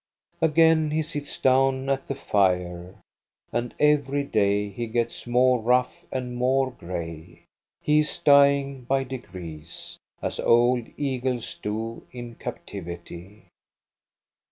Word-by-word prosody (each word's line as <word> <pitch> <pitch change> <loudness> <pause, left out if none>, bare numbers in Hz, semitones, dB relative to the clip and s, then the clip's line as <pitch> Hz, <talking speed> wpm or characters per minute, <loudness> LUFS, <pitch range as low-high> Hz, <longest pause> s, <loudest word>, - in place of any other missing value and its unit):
Again 160 0 +4
he 155 +1 0
sits 150 -2 -6
down 135 0 +3
at 135 0 -1
the 140 - -2
fire, 90 -7 0 0.6
and 120 0 -2
every 145 -1 +3
day 105 -5 +1
he 115 +4 -5
gets 120 +1 -2
more 125 +1 +4
rough 125 +3 +1
and 125 -1 -3
more 130 +2 +2
gray. 85 -6 -7 0.4
He 150 0 +4
is 150 - -1
dying 140 -1 +4
by 135 +1 +1
degrees, 85 -11 -8 0.2
as - - -3
old 120 0 +3
eagles 125 -9 -2
do 110 +5 -4
in 120 -1 -8
captivity. 85 0 -8
125 Hz, 115 wpm, -25 LUFS, 100-135 Hz, 0.6 s, Again